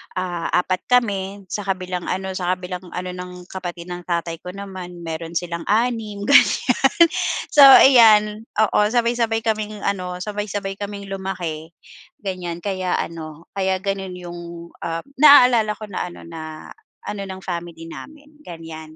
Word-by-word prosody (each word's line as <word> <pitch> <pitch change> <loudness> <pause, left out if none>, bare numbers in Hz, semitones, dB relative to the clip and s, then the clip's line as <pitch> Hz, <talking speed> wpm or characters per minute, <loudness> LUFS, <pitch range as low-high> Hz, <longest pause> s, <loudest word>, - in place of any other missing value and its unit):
ah, 180 -2 -2 0.2
4 185 0 -2
kami, 200 -5 +1
sa 205 - -3
kabilang 185 -2 -3
ano 190 +1 -2
sa 185 0 0
kabilang 180 0 -7
ano 180 0 -4
ng 180 0 -7 0.2
kapatid 175 -2 -6
ng 175 0 -6
tatay 170 -1 -2
ko 180 - -6
naman 185 -3 -8
meron 165 +1 -6
silang 170 0 -3
6, 220 -2 0
ganyan. 280 -2 +5 0.8
So 295 - +1 0.2
iyan, 220 -4 +6
oo 215 -1 +3
sabay-sabay 235 -2 +1
kaming 215 -1 -1
ano, 180 -2 -2
sabay-sabay 205 -2 -4
kaming 200 -1 -6
lumaki, 175 -5 -5 0.5
ganyan. 180 -3 -4
Kaya 185 -2 -1
ano 160 -1 -6
kaya 190 -1 +1
ganun 195 -2 -3
yung, 175 -1 -8 0.4
ah, 165 0 -3 0.2
naalala 250 -7 +7
ko 215 - -10
na - - -3
ano 175 - -11
na 155 -1 -9 0.3
ano 205 -1 -4
ng 190 0 -8
family 170 -2 -6
namin, 300 - -12
ganyan. 160 -2 -10
185 Hz, 140 wpm, -21 LUFS, 175-210 Hz, 0.8 s, naalala